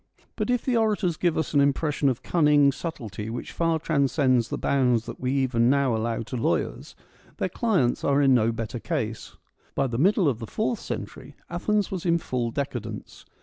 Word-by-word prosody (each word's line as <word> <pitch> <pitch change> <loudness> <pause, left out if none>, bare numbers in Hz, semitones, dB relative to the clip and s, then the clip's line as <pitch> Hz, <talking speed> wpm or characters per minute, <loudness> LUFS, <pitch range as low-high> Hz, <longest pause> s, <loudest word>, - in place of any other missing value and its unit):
But 215 -1 -2
if 245 -2 0
the 255 - +1
orators 210 -6 +1
give 170 0 0
us 160 - -2
an 145 - +5
impression 140 0 +1
of 125 - -3
cunning 150 -4 +4
subtlety 115 - -6
which 120 +2 -5
far 165 -1 +1
transcends 140 -5 +1
the - - -3
bounds 125 -4 +1
that - - -8
we 130 0 -1
even 125 -3 +2
now 135 -3 +2
allow 115 +1 -2
to 120 - -7
lawyers, 85 -9 -2 0.4
their - - -1
clients 180 - +1
are. 140 0 +3
in 135 -2 +5
no 115 -2 +3
better 115 +1 -4
case. 110 0 -4 0.4
By 135 - +1
the 120 -2 -2
middle 190 +2 +3
of 125 -6 0
the 115 - -6
fourth 220 - -1
century - - -7 0.2
Athens 210 -2 0
was 185 -3 -4
in 170 -1 +3
full 125 -7 -2
decadence. 115 -5 -5
140 Hz, 190 wpm, -25 LUFS, 120-165 Hz, 0.4 s, an